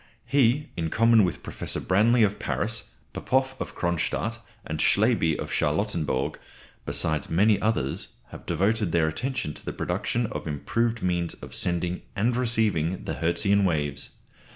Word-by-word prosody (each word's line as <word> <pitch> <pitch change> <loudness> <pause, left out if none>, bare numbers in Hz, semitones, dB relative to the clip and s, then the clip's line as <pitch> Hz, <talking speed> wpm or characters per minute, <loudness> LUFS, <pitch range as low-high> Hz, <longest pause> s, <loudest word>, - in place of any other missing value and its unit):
He, 140 +1 +2
in 80 -2 -2
common 115 +3 +5
with 90 - -2
Professors - - -3
Branly 110 +5 +4
of 105 0 -3
Paris, 110 +1 -2 0.2
Popoff 130 0 0
of - - -5
Cronstadt, 85 +7 -1 0.3
and 75 0 -4
Slaby 100 -6 +3
of - - -5
Charlottenburg, 75 -5 0 0.5
besides 80 -1 0
many 100 +4 +3
others, 105 -12 0 0.2
have - - -11
devoted 100 +2 +1
their 85 -2 +3
attention 125 - -2
to - - -8
the - - -4
production 120 0 -1
of 105 - -5
improved 115 +10 -1
means 85 -2 0
of - - -11
sending 85 0 -1
and 115 +5 +1
receiving 110 -8 0
the - - -3
Hertzian 100 +4 +2
waves. 75 -6 -1
100 Hz, 145 wpm, -26 LUFS, 80-115 Hz, 0.5 s, common